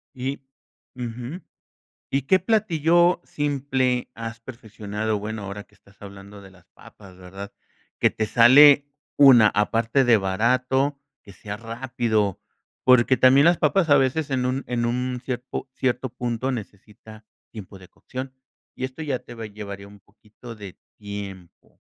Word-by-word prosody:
Y 135 +2 -4 0.5
Ujú. 125 +7 -6 0.7
¿Y 135 0 0
qué 185 +7 +3
platillo 175 -5 +2
simple 135 -4 -1
has 115 0 -7
perfeccionado? 110 -3 -5
Bueno, 110 0 -6
ahora 100 +1 -7
que - - -32
estás 100 0 -24
hablando 100 0 -12
de 95 -1 -15
las 90 -2 -22
papas, 95 -3 -16
¿verdad? 95 +2 -10 0.5
Que - - +4
te 110 - -2
sale, 140 +5 +7 0.3
una 130 -6 +7
aparte 115 +5 +1
de 115 -2 +5
barato, 130 +8 0 0.2
que 100 - -14
sea 100 +3 -8
rápido, 115 -4 -2 0.4
porque 130 0 +5
también 135 +4 +5
las 170 -1 +4
papas 165 +2 +1
a 145 - +7
veces 140 +3 0
en 125 -1 0
un 130 +2 -2
en 120 -1 -1
un 125 +1 -2
cierpo 130 +1 -5
cierto 130 0 -2
punto 120 +1 -3
necesita 110 0 -10 0.3
tiempo 100 -3 -11
de 90 - -15
cocción 130 +1 -8 0.4
y 130 - -7
esto 130 +5 -9
ya 140 -5 -2
te 120 - -13
va 115 - -8
a - - -6
llevaría 100 -1 -9
un 100 0 -16
poquito 110 +3 -14
de 100 -3 -11 0.2
tiempo. 100 -4 -10
120 Hz, 150 wpm, -23 LUFS, 105-130 Hz, 0.7 s, sale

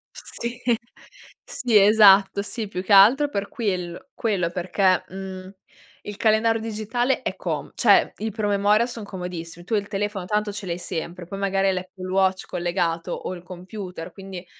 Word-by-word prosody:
Sì, 235 +1 -6 0.8
sì 240 -3 -1
esatto, 200 -1 +6
sì 215 +1 -5
più 180 -2 -4
che 200 - -1
altro 235 +10 +7
per 200 -5 -3
quiell 185 +1 -4
quello 195 -7 0
perché, 185 +1 +1
mhmm, 190 0 -8 0.5
il 210 - -7
calendario 225 +1 +2
digitale 225 +4 -1
è - - -3
com - - -4
cioè - - +4
i 220 +1 -3
promemoria 205 +1 +2
son 235 -3 -7
comodissimi, 175 -3 -7
tu 225 - -2
il 205 -1 0
telefono 200 -2 -3
tanto 210 +1 -1
ce 205 -1 -7
l'hai 170 -1 -3
sempre, 175 0 -5
poi 195 +3 -7
magari 195 0 +1
hai - - +3
l'Apple 185 0 -6
Watch 190 0 +2
collegato 175 -1 -2
o - - -4
il 175 - -10
computer 180 -1 -8
quindi 190 -2 -9
195 Hz, 160 wpm, -23 LUFS, 180-215 Hz, 0.8 s, altro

